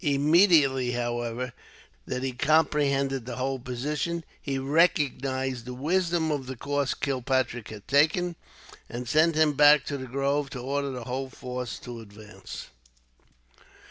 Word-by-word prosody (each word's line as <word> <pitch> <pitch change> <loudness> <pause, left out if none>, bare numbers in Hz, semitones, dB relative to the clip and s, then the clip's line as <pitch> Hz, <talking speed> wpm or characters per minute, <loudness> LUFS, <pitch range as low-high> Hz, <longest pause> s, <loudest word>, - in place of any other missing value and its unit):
Immediately, 145 -3 +4
however, 120 0 -3 0.5
that 125 - -3
he 135 - -1
comprehended 140 -2 +1
the 125 - -4
whole 130 +1 -2
position, 150 +7 -3 0.2
he 135 -2 -2
recognized 135 -4 +1
the 125 0 -6
wisdom 165 +3 +1
of 140 -4 -2
the 130 - -5
course 140 +2 -1
Kilpatrick 130 -4 -1
had 105 -2 -10
taken, 160 +5 +3 0.5
and 120 +1 -6
sent 155 +5 +3
him 155 -1 +4
back 145 -1 +6
to 140 - -3
the 130 - -6
grove, 140 +2 0
to 135 - -6
order 140 +3 -2
the 125 -2 -5
whole 130 +2 -4
force 125 -2 -5
to 120 -2 -8
advance. 105 0 -10
135 Hz, 140 wpm, -27 LUFS, 125-150 Hz, 0.5 s, back